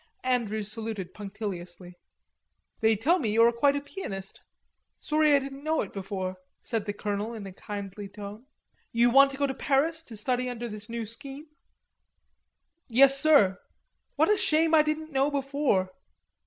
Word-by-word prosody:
Andrews 220 -5 -1
saluted 215 -5 -5
punctiliously. 190 -4 -7 0.9
"They 220 0 +3
tell 310 - +2
me 235 -8 -1
you 225 +2 +4
are 235 - +6
quite 280 +4 +2
a 285 - -1
pianist.... 195 - -7 0.6
Sorry 305 -1 +3
I - - +6
didn't 275 0 -6
know 315 +1 +1
it 200 - -6
before," 190 -1 -4 0.3
said 225 -4 -2
the 205 - -2
colonel 205 +2 -3
in 210 -3 -7
a 190 - -8
kindly 200 0 -7
tone. 205 +5 -9 0.4
"You 235 +1 +3
want 275 +2 +7
to 275 - -8
go 285 - +1
to 270 - -2
Paris 300 +5 +1
to 225 - -10
study 250 +3 -1
under 240 -1 -5
this 210 0 -9
new 230 -1 -4
scheme?" 275 +6 -7 1.4
"Yes, 275 +3 +6
sir." 245 -12 +5 0.6
"What - - +3
a 420 - +3
shame 325 -4 +2
I 315 - +7
didn't 305 +1 -2
know 275 0 +2
before. 275 -9 0
235 Hz, 165 wpm, -28 LUFS, 205-280 Hz, 1.4 s, want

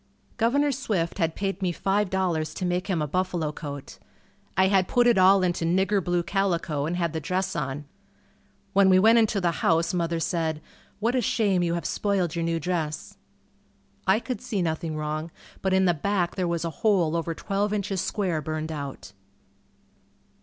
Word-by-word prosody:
Governor 280 +6 +2
Swift 205 -11 -2
had 165 -2 0
paid 195 -1 -3
me 185 -2 +1
$5.00 185 -5 0
to 185 - -3
make 180 +1 -1
him 175 -6 0
a - - -2
buffalo 175 -1 -1
coat. 145 -2 -8 0.6
I 190 - +5
had 190 -1 +3
put 245 0 +3
it 240 -5 +4
all 190 +1 +6
into 175 -2 0
"nigger 190 +3 +2
blue" 175 0 0
calico 170 -7 0
and 170 - -2
had 170 -3 -1
the 160 - -2
dress 185 +4 -2
on. 140 +2 -3 0.9
When 195 -1 +5
we 185 - +6
went 225 +5 +6
into 215 -2 +2
the 175 -2 +1
house 165 +1 +2
mother 170 -1 0
said, 160 -2 -1 0.4
"What 230 +3 +1
a 255 - +2
shame 200 -5 +1
you 170 -1 0
have 170 - -4
spoiled 190 -5 0
your 170 - -1
new 165 0 0
dress." 160 -2 -3 0.9
I 190 +3 +4
could 245 -3 -5
see 195 -5 -2
nothing 160 -1 -2
wrong, 155 +1 -3 0.3
but 190 - 0
in 190 0 +4
the 175 - +4
back 180 +2 0
there 185 -2 0
was 170 -1 -1
a 165 - -2
hole 180 -7 +3
over 165 0 -2
twelve 200 +2 -1
inches 200 -3 -1
square 180 -7 -1
burned 155 +1 -4
out. 140 -9 -7
180 Hz, 180 wpm, -26 LUFS, 165-195 Hz, 0.9 s, all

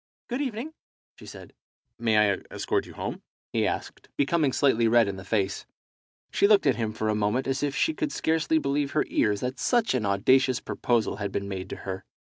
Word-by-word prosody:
"Good 250 +3 -2
evening," 265 +3 -4 0.5
she - - -12
said. - - -11 0.5
"May 115 -2 +2
I - - -2
escort - - -1
you - - -11
home?" - - -5 0.3
he - - +2
asked, - - -5
becoming 145 0 +2
slightly 120 -4 +3
red 115 -1 +5
in 100 - -3
the 95 - -9
face. 100 -1 -1 0.6
She 200 - +3
looked 205 -4 +5
at 135 - +5
him 110 -2 -2
for 110 0 -3
a 110 - +2
moment 105 +5 0
as 135 0 -1
if 145 -1 -1
she 320 - +2
could 310 -1 -2
scarcely 160 0 +1
believe 140 -1 -1
her 155 - +2
ears 105 -2 +1
that 125 +1 -3
such 240 -3 +2
an 115 -6 0
audacious 130 +6 +3
proposal 115 -4 -1
had 100 -1 -3
been 100 0 -3
made 95 -1 -5
to - - -5
her. 95 -1 -4
125 Hz, 205 wpm, -27 LUFS, 105-150 Hz, 0.6 s, red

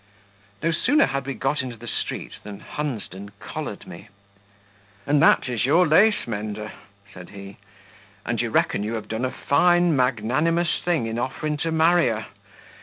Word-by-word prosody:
No 165 - +2
sooner 285 - +3
had 140 0 -3
we 135 - -3
got 135 +2 0
into 125 -2 -6
the - - -11
street - - -4
than 100 -1 -9
Hunsden 105 - -5
collared - - -6
me. - - -11 1.0
"And 145 0 +3
that 160 - +5
is 120 -3 -1
your 160 +8 +4
lace 205 +8 +4
mender?" 105 -1 -5 0.4
said 90 -1 -11
he; 100 0 -10 0.7
"and 120 -1 -1
you 120 - -2
reckon 105 - +1
you 110 +3 -2
have 110 -2 -5
done 110 +3 -2
a - - 0
fine, 175 +2 +3
magnanimous 135 +7 +1
thing 170 -9 +1
in 115 +1 -3
offering 150 +4 -2
to 165 +2 -2
marry 165 +2 +4
her? 110 -2 -2
130 Hz, 165 wpm, -24 LUFS, 110-160 Hz, 1.0 s, that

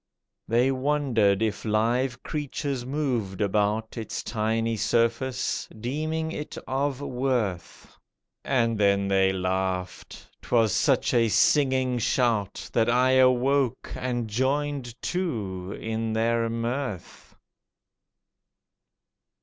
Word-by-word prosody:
They 120 +4 +3
wondered 130 -7 +1
if 110 -1 -2
live 120 +4 0
creatures 140 -4 -3
moved 125 -9 -2
about 105 +3 0
Its 110 - -5
tiny 115 +1 -1
surface, 115 +4 0
deeming 155 +6 -2
it 150 -2 -6
of 135 0 -1
worth. 125 -10 -3 0.5
And 115 -5 +1
then 100 -1 +3
they 95 -1 +3
laughed—'twas 95 +4 -2
such - - +2
a 115 -2 +4
singing 130 0 +3
shout 115 -4 0
That 115 0 +2
I 125 +2 +3
awoke 130 0 +2
and 120 -2 -2
joined 130 +1 -1
too 105 - -3
in 110 0 -2
their 115 +1 +1
mirth. 115 -2 -4
120 Hz, 95 wpm, -26 LUFS, 110-130 Hz, 0.5 s, a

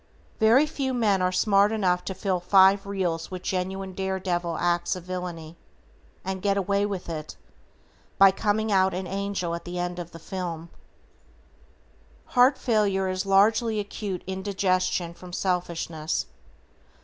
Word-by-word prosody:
Very 230 +7 +5
few 275 -4 -3
men 205 -5 +2
are 180 0 +2
smart 200 +2 +3
enough 185 -5 +1
to 190 - -4
fill 190 -3 -1
five 195 +2 +5
reels 180 -5 -2
with 185 -1 -7
genuine 190 +1 -3
dare 190 0 -2
devil 175 -2 -2
acts 175 0 0
of 180 - -8
villainy, 175 -3 -6 0.7
and 190 0 -3
get 200 0 +1
away 200 +1 +1
with 195 -3 -5
it, 155 -2 -6 0.8
by 195 -1 +8
coming 215 +2 0
out 190 -2 +3
an 185 +1 -3
angel 195 -2 -3
at 170 - -5
the 175 0 -6
end 175 0 -3
of 175 -1 -6
the 165 - -11
film. 170 -1 -6 1.6
Heart 255 +2 +5
failure 200 -5 +1
is 185 +1 -2
largely 215 +3 +3
acute 200 -2 -5
indigestion 190 -2 -1
from 180 +1 -12
selfishness. 170 -4 -2
190 Hz, 145 wpm, -26 LUFS, 180-200 Hz, 1.6 s, by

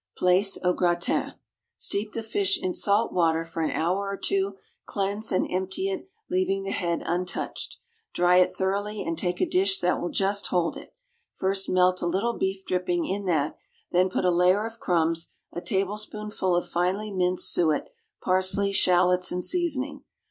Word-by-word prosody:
=Plaice, 185 +2 +3
au 180 0 +3
Gratin.= 175 -1 0 0.4
Steep 210 +1 -1
the 225 - -3
fish 200 -3 +1
in 185 -1 -2
salt 210 +3 +1
water 165 -2 +2
for 165 0 -5
an 160 - +1
hour 185 +5 0
or 200 - -3
two, 195 0 -1 0.3
cleanse 205 +2 -1
and 185 - +2
empty 190 - -1
it, 380 0 -5 0.2
leaving 190 +1 0
the 195 - -3
head 170 -3 -1
untouched. 180 +2 -3 0.3
Dry 180 0 +4
it 180 - +5
thoroughly, 205 +2 -2
and 165 - -2
take 175 +2 -2
a - - +3
dish 190 +1 +1
that 180 0 +1
will 175 - -2
just 200 +1 0
hold 175 -2 0
it. - - -12 0.4
First 195 0 -1
melt 185 0 +3
a 175 - 0
little 195 +7 0
beef 190 0 -2
dripping 180 -1 0
in 200 +1 -3
that, 155 -4 0 0.3
then 180 +1 +3
put 185 - -1
a 180 - +4
layer 180 +4 +3
of 230 0 -8
crumbs, 165 -1 0 0.2
a 175 - -4
tablespoonful 210 -1 -1
of 175 - 0
finely 190 +5 -1
minced 180 -1 +1
suet, 155 -3 +2 0.4
parsley, 190 +2 +2
shallots, 180 -1 +3
and 180 0 -2
seasoning. 300 -6 -1
185 Hz, 170 wpm, -26 LUFS, 180-200 Hz, 0.4 s, it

